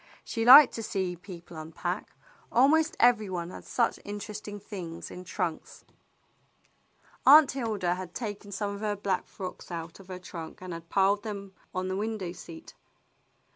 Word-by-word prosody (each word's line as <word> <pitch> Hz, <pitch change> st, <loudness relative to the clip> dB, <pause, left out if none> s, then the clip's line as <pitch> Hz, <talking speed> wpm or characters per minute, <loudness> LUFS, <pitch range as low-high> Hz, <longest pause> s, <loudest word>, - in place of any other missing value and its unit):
She 225 Hz, -1 st, -2 dB
liked 270 Hz, +2 st, +10 dB
to 230 Hz, -, -4 dB
see 190 Hz, -4 st, -2 dB
people 175 Hz, -1 st, -11 dB
unpack. 165 Hz, +4 st, -5 dB, 0.4 s
Almost 310 Hz, +6 st, +4 dB
every 235 Hz, -4 st, +4 dB
one 175 Hz, -1 st, -4 dB
had -, -, -10 dB
such 235 Hz, -, 0 dB
inter 205 Hz, +1 st, -7 dB
esting 205 Hz, 0 st, -7 dB
things 185 Hz, -5 st, -7 dB
in 180 Hz, -, -8 dB
trunks. 180 Hz, -3 st, -4 dB
le -, -, -31 dB
THE -, -, -34 dB, 1.3 s
BLUE 270 Hz, -, +9 dB
AUNT 305 Hz, -, +13 dB
Aunt 275 Hz, -, -5 dB
Hilda 215 Hz, -9 st, -1 dB
had 180 Hz, -1 st, -7 dB
taken 205 Hz, -3 st, -5 dB
some 200 Hz, +1 st, -2 dB
of 200 Hz, -, -7 dB
her 210 Hz, -1 st, 0 dB
black 195 Hz, -2 st, -2 dB
frocks 185 Hz, -2 st, -8 dB
out 165 Hz, 0 st, -6 dB
of 195 Hz, -, -14 dB
her 185 Hz, -1 st, -6 dB
trunk 170 Hz, -3 st, -8 dB
and 185 Hz, -1 st, -7 dB
had 165 Hz, 0 st, -9 dB
piled 200 Hz, +1 st, +3 dB
them 200 Hz, -2 st, -6 dB, 0.2 s
on 185 Hz, 0 st, -1 dB
the 185 Hz, -, -2 dB
window 210 Hz, -3 st, -3 dB
seat. 165 Hz, -2 st, -11 dB
195 Hz, 180 wpm, -29 LUFS, 180-215 Hz, 1.3 s, AUNT